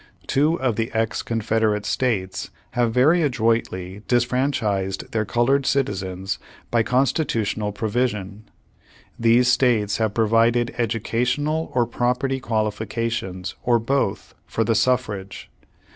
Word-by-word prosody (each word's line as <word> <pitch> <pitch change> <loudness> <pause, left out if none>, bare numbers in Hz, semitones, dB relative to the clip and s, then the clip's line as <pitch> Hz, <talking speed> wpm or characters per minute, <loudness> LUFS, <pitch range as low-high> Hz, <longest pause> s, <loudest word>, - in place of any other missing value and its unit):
Two 155 +5 +2
of 125 -5 0
the 115 0 -1
ex 110 0 0
Confederate 110 -2 0
States 105 -7 -1 0.2
have 120 -2 +1
very 145 +9 +4
adroitly 115 - 0
disfranchised 120 -6 0
their 110 -1 0
colored 130 +5 +1
citizens 95 -7 -1 0.3
by 115 - +3
constitutional 115 -4 0
provision. 105 -2 -2 0.7
These 115 +2 +4
states 115 -6 +2
have 110 -2 -1
pro 115 -1 +2
vided 115 +2 +3
educational 125 +7 -1
or 120 -2 +3
property 125 +3 -1
qualifications, 110 -4 -2
or 120 -1 +3
both, 115 -3 -1
for 115 - 0
the 115 +1 +1
suffrage. 105 -6 -1
115 Hz, 115 wpm, -23 LUFS, 105-125 Hz, 0.7 s, very